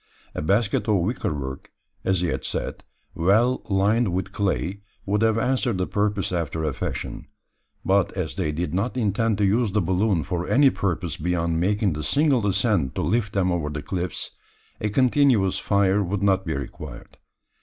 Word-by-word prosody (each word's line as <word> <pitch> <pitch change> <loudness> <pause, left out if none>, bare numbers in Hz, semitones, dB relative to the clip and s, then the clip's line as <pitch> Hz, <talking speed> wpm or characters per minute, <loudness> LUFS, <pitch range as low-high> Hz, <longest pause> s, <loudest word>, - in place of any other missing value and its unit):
A - - -3
basket 100 +9 +1
of 105 - +3
wicker 95 +4 0
work, 65 -2 -6 0.3
as 95 -2 +1
he 90 - +1
had - - -3
said, - - -4 0.3
well 110 +9 +2
lined 100 +2 +2
with 95 +2 -2
clay, 100 0 -1 0.2
would 105 +2 0
have 110 0 +3
answered 125 -2 +1
the 90 - 0
purpose 105 -1 -1
after 80 -2 -2
a 75 -3 0
fashion; - - -5 0.6
but - - +3
as - - -3
they 75 - -1
did 80 +1 -3
not 105 +8 -1
intend 110 -1 +1
to 105 - +2
use 105 +1 +2
the 105 - +3
balloon 95 -1 +1
for 90 +2 -3
any 140 0 +5
purpose 90 -4 -2
beyond 85 0 0
making 100 +1 +1
the 75 0 -4
single 140 - +2
ascent 100 - +1
to - - -1
lift 110 -2 0
them 95 -2 +1
over 85 -4 -1
the 75 0 -5
cliffs, 90 -3 -3 0.5
a 105 - -1
continuous 125 -4 +3
fire 100 0 +2
would 100 +2 -2
not 95 -2 +2
be 80 - -1
required. 70 -1 -8
95 Hz, 175 wpm, -24 LUFS, 85-110 Hz, 0.6 s, any